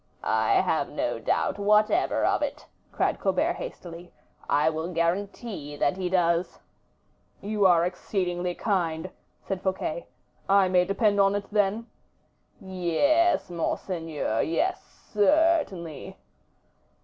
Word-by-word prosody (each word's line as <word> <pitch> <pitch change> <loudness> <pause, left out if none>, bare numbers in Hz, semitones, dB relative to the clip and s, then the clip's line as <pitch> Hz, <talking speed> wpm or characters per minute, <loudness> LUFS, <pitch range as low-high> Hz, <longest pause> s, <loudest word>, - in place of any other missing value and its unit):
"I - - +1
have - - 0
no - - -2
doubt - - -1
whatever 210 - +2
of - - +1
it," - - -4 0.3
cried - - 0
Colbert, - - +1
hastily; 175 - -9 0.4
"I 150 +2 +3
will 160 +2 -2
guarantee 170 -1 -3
that 145 +2 +1
he 185 -1 -3
does." 175 -1 +1 0.8
"You 205 -1 +2
are 170 -2 +4
exceedingly 180 -1 -2
kind," 180 -4 -1 0.3
said 190 -1 -4
Fouquet. 185 -3 -3 0.4
"I 195 -1 +5
may 180 -1 +3
depend 205 +1 +1
on 195 0 +4
it, 205 0 -3
then?" 210 +2 +1 0.7
"Yes, 195 - +1
monseigneur; 165 - -2
yes, 340 - 0 0.3
certainly." 210 - +1
185 Hz, 115 wpm, -26 LUFS, 170-205 Hz, 0.8 s, I